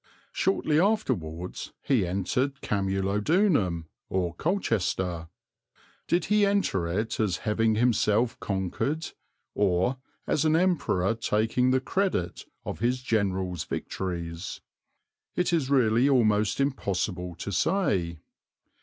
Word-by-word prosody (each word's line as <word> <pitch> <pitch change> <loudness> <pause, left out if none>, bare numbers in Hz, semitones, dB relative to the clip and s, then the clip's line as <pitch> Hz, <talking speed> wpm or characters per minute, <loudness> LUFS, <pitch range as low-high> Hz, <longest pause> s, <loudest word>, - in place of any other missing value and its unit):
Shortly 155 -5 +1
afterwards 90 - -1
he 115 -10 +2
entered 125 +10 -1
Camulodunum, 100 - +1 0.2
or 90 -3 -1
Colchester. 95 - -1 0.8
Did 170 -1 +1
he 210 +1 +3
enter 200 - +1
it 105 +6 -2
as 105 -6 +1
having 110 0 +2
himself 115 0 +2
conquered, 100 - -2 0.4
or 100 +6 +1 0.3
as 150 - +1
an 155 0 +3
Emperor 165 - +2
taking 115 +2 +1
the 130 0 +3
credit 185 - -1 0.2
of - - -5
his 125 +3 0
general's 95 -7 0
victories? 85 -1 -4 0.8
It 180 -1 +1
is 150 -6 +1
really 125 -1 +4
almost 110 -4 +3
impossible 95 -9 -1
to 95 +4 -5
say. 90 - 0
110 Hz, 105 wpm, -27 LUFS, 90-140 Hz, 0.8 s, really